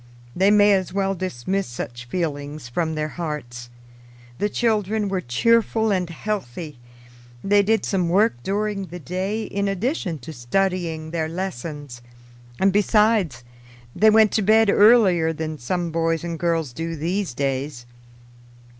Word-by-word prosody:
They 190 Hz, +3 st, +4 dB
may 205 Hz, 0 st, +6 dB
as 190 Hz, -2 st, 0 dB
well 195 Hz, 0 st, 0 dB
dismiss 185 Hz, +1 st, -3 dB
such 120 Hz, 0 st, -7 dB
feelings 145 Hz, -2 st, -4 dB
from 160 Hz, +5 st, -2 dB
their 155 Hz, 0 st, -1 dB
hearts. 145 Hz, -8 st, -6 dB, 0.7 s
The 205 Hz, -, +1 dB
children 215 Hz, -2 st, 0 dB
were 190 Hz, -1 st, -1 dB
cheerful 220 Hz, -, +2 dB
and 180 Hz, -3 st, 0 dB
healthy; 165 Hz, -, -5 dB, 0.6 s
they 205 Hz, +1 st, +4 dB
did 220 Hz, +2 st, +1 dB
some 180 Hz, -4 st, 0 dB
work 205 Hz, +6 st, +3 dB
during 200 Hz, -, -2 dB
the 175 Hz, -, -8 dB
day 190 Hz, +6 st, -3 dB
in 200 Hz, -1 st, -2 dB
addition 195 Hz, -, -2 dB
to 145 Hz, +4 st, -9 dB
studying 160 Hz, +4 st, -1 dB
their 160 Hz, -2 st, -2 dB
lessons; 150 Hz, -7 st, -6 dB, 0.6 s
and 195 Hz, 0 st, +3 dB
besides 205 Hz, -, +2 dB, 0.5 s
they 220 Hz, -, +5 dB
went 215 Hz, -1 st, +5 dB
to 220 Hz, -, +1 dB
bed 215 Hz, +1 st, +4 dB
earlier 200 Hz, -8 st, +5 dB
than 155 Hz, -1 st, -5 dB
some 175 Hz, +7 st, -2 dB
boys 165 Hz, 0 st, 0 dB
and 170 Hz, -2 st, -4 dB
girls 165 Hz, -6 st, -1 dB
do 165 Hz, +5 st, -4 dB
these 170 Hz, -1 st, -2 dB
days. 135 Hz, -2 st, -3 dB
180 Hz, 140 wpm, -22 LUFS, 155-205 Hz, 0.7 s, may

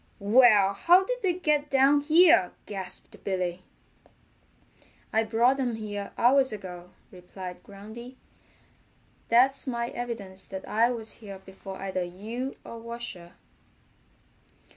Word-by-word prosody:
"Well, 210 Hz, -2 st, +5 dB
how'd 360 Hz, -, +4 dB
they 375 Hz, -4 st, +1 dB
get 300 Hz, -4 st, 0 dB
down 275 Hz, +1 st, +4 dB
here?" 315 Hz, -, +5 dB
gasped 190 Hz, -3 st, -6 dB
Billy. 185 Hz, -2 st, -2 dB, 1.5 s
"I 220 Hz, -, +3 dB
brought 235 Hz, +4 st, +2 dB
them 250 Hz, -4 st, -1 dB
here 205 Hz, -2 st, -6 dB
hours 265 Hz, +2 st, +4 dB
ago," 180 Hz, -4 st, -8 dB, 0.2 s
replied 180 Hz, 0 st, -9 dB
Groundy. 220 Hz, +5 st, -11 dB, 1.1 s
"That's 265 Hz, +4 st, +3 dB
my 235 Hz, -2 st, -2 dB
evidence 225 Hz, -7 st, -6 dB
that 190 Hz, 0 st, -8 dB
I 230 Hz, +3 st, +3 dB
was 225 Hz, -2 st, -5 dB
here 200 Hz, -3 st, -9 dB
before 190 Hz, 0 st, -10 dB
either 190 Hz, -1 st, -3 dB
you 220 Hz, +9 st, -6 dB
or 230 Hz, -, -8 dB
Washer." 230 Hz, -7 st, -8 dB
225 Hz, 115 wpm, -27 LUFS, 190-255 Hz, 1.5 s, Well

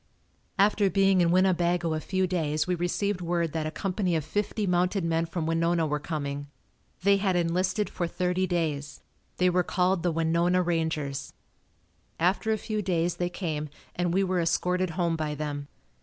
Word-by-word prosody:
After 205 Hz, 0 st, +4 dB
being 195 Hz, -1 st, +4 dB
in 170 Hz, -, +3 dB
Winnebago 175 Hz, -2 st, +2 dB
a 155 Hz, -, -1 dB
few 185 Hz, +3 st, 0 dB
days 155 Hz, -4 st, 0 dB
we 180 Hz, -, 0 dB
received 180 Hz, +3 st, -1 dB
word 170 Hz, -2 st, -1 dB
that 160 Hz, -1 st, -1 dB
a -, -, -1 dB
company 185 Hz, +1 st, -1 dB
of 155 Hz, -3 st, -1 dB
fifty 205 Hz, +5 st, -1 dB
mounted 180 Hz, +1 st, +1 dB
men 165 Hz, 0 st, +1 dB
from 165 Hz, -1 st, -3 dB
Winona 165 Hz, +1 st, +1 dB
were 150 Hz, -1 st, -1 dB
coming. 145 Hz, -2 st, -4 dB, 0.6 s
They 200 Hz, +1 st, +5 dB
had 195 Hz, -2 st, +1 dB
enlisted 185 Hz, +4 st, +1 dB
for 175 Hz, -, -3 dB
thirty 180 Hz, +2 st, 0 dB
days. 155 Hz, -5 st, -2 dB, 0.3 s
They 180 Hz, -, +3 dB
were 180 Hz, +1 st, +3 dB
called 180 Hz, 0 st, +1 dB
the 175 Hz, 0 st, +1 dB
Winona 170 Hz, +3 st, +2 dB
Rangers. 160 Hz, -5 st, -2 dB, 0.9 s
After 185 Hz, +6 st, +2 dB
a 220 Hz, -, +2 dB
few 215 Hz, 0 st, -3 dB
days 175 Hz, -2 st, 0 dB
they 175 Hz, 0 st, -1 dB
came 155 Hz, -4 st, -3 dB, 0.3 s
and 175 Hz, -1 st, 0 dB
we 190 Hz, +3 st, +2 dB
were 185 Hz, -2 st, +1 dB
escorted 180 Hz, +2 st, +1 dB
home 170 Hz, -2 st, +1 dB
by 155 Hz, -2 st, -2 dB
them. 145 Hz, -1 st, -4 dB
175 Hz, 170 wpm, -27 LUFS, 160-185 Hz, 0.9 s, They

